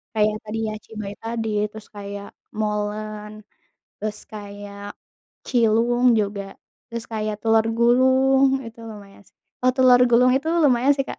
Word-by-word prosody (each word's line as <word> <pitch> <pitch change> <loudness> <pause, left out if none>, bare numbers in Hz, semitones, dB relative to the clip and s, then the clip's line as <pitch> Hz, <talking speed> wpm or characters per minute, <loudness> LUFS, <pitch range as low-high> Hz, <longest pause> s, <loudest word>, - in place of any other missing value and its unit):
Kayak 215 0 +2
tadi 215 +1 -5
ya 215 - -4
cibay 210 -2 -7
tadi, 225 -1 -3 0.2
terus 220 0 -12
kayak 200 0 -7 0.3
molen, 210 0 -4 0.5
terus 215 0 -4
kayak 205 -1 -9 0.5
cilung 240 +1 +2
juga, 200 -1 -3 0.5
terus 235 -1 -6
kayak 215 -1 -2
telur 225 0 +3
gulung 265 +2 +4
itu 230 0 -11
lumayan 200 -1 -13
sih. - - -27 0.3
Eh 255 - +5
telur 255 -2 +6
gulung 250 +2 +5
itu 300 +4 -2 0.2
lumayan 265 0 +4
sih 275 - 0
Kak, - - -6
220 Hz, 140 wpm, -22 LUFS, 210-245 Hz, 0.5 s, telur